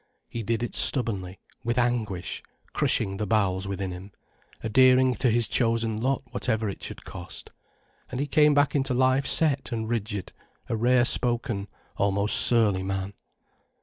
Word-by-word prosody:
He 115 - -5
did 115 +2 -2
it 120 - -4
stubbornly, 100 -8 -1 0.2
with 120 0 -2
anguish, 110 -7 -1 0.3
crushing 95 0 0
the 105 +1 -3
bowels 95 -3 0
within 95 -1 -4
him, 90 +3 -9 0.5
adhering 130 +3 +4
to 125 - +2
his 115 0 +2
chosen 115 -2 0
lot 130 +5 -1
whatever 110 -3 -1
it 100 - -6
should - - -8
cost. - - -9 0.6
And 125 - -5
he 140 - 0
came 150 0 +4
back 145 0 +3
into 135 -2 0
life 130 +2 +2
set 140 -5 +1
and 110 -2 -3
rigid, 105 -4 -4 0.3
a - - -2
rare 120 +2 +3
spoken, 120 -5 +1 0.3
almost 100 +1 +1
surly 110 -6 +4
man. 95 +1 -4
115 Hz, 150 wpm, -26 LUFS, 100-125 Hz, 0.6 s, adhering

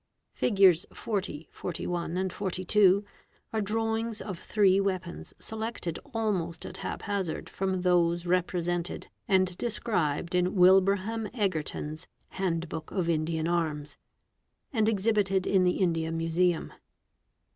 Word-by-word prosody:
Fig. 195 -5 +5 0.2
40, 180 -8 -3
41, 175 +1 -3
42, 190 +1 +2 0.5
are 220 - +1
drawings 225 +1 -1
of 185 -5 -6
three 195 -2 +3
weapons 185 -3 -3
selected 220 -6 -4
almost 190 -8 -1
at - - -7
hap - - -5
hazard 195 -6 -2
from 190 -1 -2
those 175 -1 +2
represented 175 -1 -1 0.2
and 185 -2 +3
described 185 -9 -1
in 180 +2 +1
Wilbraham 195 +4 +4
Egerton's 160 -6 -2 0.2
'Handbook 165 -4 -3
of 180 -3 -1
Indian 160 0 0
Arms," 155 -4 -1 0.4
" - - -45
and 220 -3 +3
exhibited 200 -3 +1
in 190 -2 +3
the 180 - +2
India 165 -3 +1
Museum. 165 +1 0
185 Hz, 115 wpm, -29 LUFS, 170-200 Hz, 0.5 s, Fig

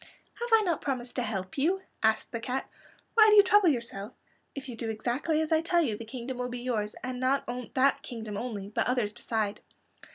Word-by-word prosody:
"Have 475 0 -3
I 450 -1 +6
not 345 -5 0
promised 255 -3 -3
to - - +2
help 195 -1 -3
you?" 370 +7 +1 0.2
asked 220 0 +2
the 230 - -3
cat. 255 +3 -3 0.5
"Why 440 -1 +7
do 425 - +6
you 410 - +9
trouble 400 -2 +5
yourself? 235 -5 -3 0.4
If 275 -1 -6
you 245 - -6
do 225 0 -4
exactly 245 +8 0
as 315 +1 -2
I 320 0 +4
tell 340 +1 +2
you 230 -8 0
the 230 +2 -8
kingdom 250 +2 -6
will 250 0 -2
be 245 - -5
yours; 215 -4 -2
and 255 -1 -4
not 260 +2 +1 0.3
that 270 +1 +3
kingdom 220 -4 -6
only, 205 -3 -4
but 210 - 0
others 240 -4 0
beside." 215 -2 -2
250 Hz, 215 wpm, -29 LUFS, 225-305 Hz, 0.5 s, you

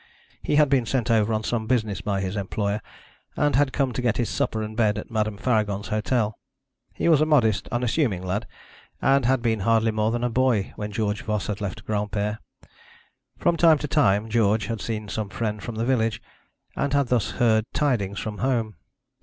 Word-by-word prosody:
He - - 0
had 150 0 +5
been 135 -4 +1
sent 120 -1 0
over 110 -1 +3
on 110 0 0
some 110 -1 -2
business 110 -6 0
by 100 -1 -1
his 95 +1 -3
employer, 100 +1 -2 0.5
and 145 -2 +1
had 140 0 +3
come 135 -3 0
to 125 - -2
get 120 -2 +1
his 120 - 0
supper 110 -1 -1
and 110 0 -6
bed 110 -2 +2
at 105 - -7
Madame 110 -2 -1
Faragon's 105 -3 0
hotel. 110 0 0 0.6
He - - -1
was 160 -3 +5
a - - +4
modest, 110 -9 +2
unassuming 120 - 0
lad, 95 +4 -2 0.5
and 135 -2 +3
had 130 -1 +2
been 110 -2 +1
hardly 115 +2 +2
more 110 0 0
than 120 +1 -2
a 125 - +1
boy 120 -5 +1
when 105 0 -5
George 105 -1 -1
Voss 105 -4 -2
had 105 -1 -4
left 100 -3 -5
Granpere. 105 0 -2 1.0
From 175 - +2
time 165 -2 +6
to 150 - -4
time 110 -8 +2
George 110 -1 +2
had 115 -2 -4
seen 110 -2 -4
some 105 0 -3
friend 105 +1 -3
from 115 - -6
the 115 +1 -1
village, 115 -4 +1 0.6
and 140 0 -1
had 140 -3 +2
thus 120 -5 +1
heard 110 -2 +2
tidings 105 -9 0
from 105 -2 -5
home. 115 -7 -1
110 Hz, 195 wpm, -24 LUFS, 105-125 Hz, 1.0 s, time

